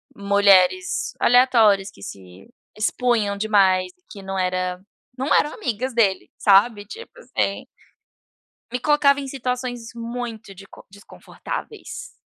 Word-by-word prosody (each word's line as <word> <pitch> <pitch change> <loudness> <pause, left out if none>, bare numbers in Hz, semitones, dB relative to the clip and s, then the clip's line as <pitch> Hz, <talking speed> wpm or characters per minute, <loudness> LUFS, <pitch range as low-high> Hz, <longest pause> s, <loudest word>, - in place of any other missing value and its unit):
mulheres 200 - +2
aleatórias 230 -6 +4
que 100 - -19
se 95 -1 -11 0.3
expunham 215 -1 0
demais, 190 -3 +2
e 180 - -41
que 200 - -10
não 195 0 -4
era 185 0 -2 0.4
não 265 +3 0
eram 295 - +2
amigas 255 - -4
dele, 210 -5 +1
sabe, 205 +1 +4
tipo 460 - -11
assim. - - -3 1.0
Me 250 - -3
colocava 285 0 +3
em 275 - -6
situações 250 -3 -4
muito 230 -3 -7
deco 195 +1 -15
desconfortáveis, 435 - -9
215 Hz, 115 wpm, -22 LUFS, 195-250 Hz, 1.0 s, aleatórias